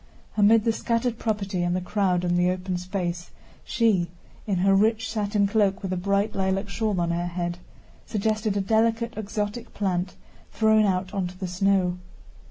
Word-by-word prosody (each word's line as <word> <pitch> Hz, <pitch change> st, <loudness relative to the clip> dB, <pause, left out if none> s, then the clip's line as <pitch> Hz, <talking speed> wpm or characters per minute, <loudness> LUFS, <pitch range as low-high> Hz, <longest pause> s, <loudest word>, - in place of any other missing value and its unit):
Amid 215 Hz, +1 st, +5 dB
the 230 Hz, -, +2 dB
scattered 230 Hz, +1 st, -1 dB
property 200 Hz, -4 st, -1 dB
and 175 Hz, 0 st, 0 dB
the -, -, +1 dB
crowd 180 Hz, -1 st, 0 dB
on 175 Hz, 0 st, +1 dB
the 180 Hz, 0 st, +3 dB
open 185 Hz, 0 st, -2 dB
space, 180 Hz, -2 st, -3 dB, 0.3 s
she, 210 Hz, -7 st, +1 dB, 0.4 s
in 200 Hz, -, +1 dB
her 195 Hz, -, +5 dB
rich 220 Hz, +3 st, +2 dB
satin 205 Hz, -2 st, +1 dB
cloak 200 Hz, -2 st, +1 dB
with 190 Hz, -1 st, -2 dB
a -, -, 0 dB
bright 200 Hz, +3 st, 0 dB
lilac 195 Hz, +1 st, -1 dB
shawl 210 Hz, -2 st, -1 dB
on 170 Hz, -1 st, 0 dB
her 175 Hz, +1 st, -1 dB
head, 175 Hz, 0 st, -3 dB, 0.5 s
suggested 215 Hz, -1 st, 0 dB
a -, -, +1 dB
delicate 225 Hz, +3 st, +1 dB
exotic 210 Hz, +1 st, -4 dB
plant 185 Hz, -2 st, -1 dB, 0.4 s
thrown 220 Hz, -1 st, +4 dB
out 185 Hz, 0 st, -1 dB
onto 180 Hz, -2 st, -3 dB
the 190 Hz, -, -4 dB
snow. 180 Hz, 0 st, +1 dB
195 Hz, 170 wpm, -25 LUFS, 180-215 Hz, 0.5 s, Amid